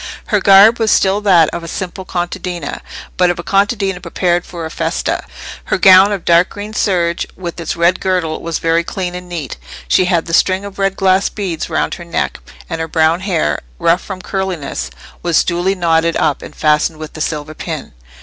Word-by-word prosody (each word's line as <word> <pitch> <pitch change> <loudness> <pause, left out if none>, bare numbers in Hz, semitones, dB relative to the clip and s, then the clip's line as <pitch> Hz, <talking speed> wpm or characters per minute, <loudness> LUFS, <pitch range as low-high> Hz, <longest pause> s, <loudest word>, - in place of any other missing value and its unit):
Her 210 - +3
garb 200 +5 +7
was 225 -1 +1
still 195 0 +3
that 180 -6 +5
of 170 - -5
a - - -7
simple 185 +2 -5
contadina, 175 -3 -4 0.4
but 180 -1 +4
of 175 - -1
a 175 - -6
contadina 195 -2 0
prepared 175 0 -1
for 170 -2 -6
a 160 - -6
festa: - - -2 0.4
her - - 0
gown 190 +1 +7
of 200 -4 -3
dark 170 +2 +4
green 205 +1 -8
serge, 175 -5 0
with 175 -2 -6
its 165 - -3
red 170 +2 +2
girdle, 180 -4 -1
was 165 -1 -2
very 165 +1 +1
clean 180 0 -4
and 180 0 -8
neat; 155 - -5 0.3
she 185 - +3
had 175 -3 +1
the 165 - -6
string 190 +3 +2
of 200 0 -9
red 195 0 +1
glass 190 0 +2
beads 185 -6 -4
round - - -1
her 175 - -7
neck; 170 - -2 0.3
and 165 -1 -4
her 160 - -2
brown 160 +1 +2
hair, 175 - 0 0.2
rough 170 - +2
from 185 -2 -8
curliness, 180 - -3 0.3
was 170 -2 +2
duly 180 +2 0
knotted 165 -2 +1
up, 150 - 0
and - - -10
fastened 155 +1 +1
with 155 0 -8
the 155 - -7
silver 150 -1 -3
pin. - - -6
175 Hz, 195 wpm, -16 LUFS, 165-190 Hz, 0.4 s, garb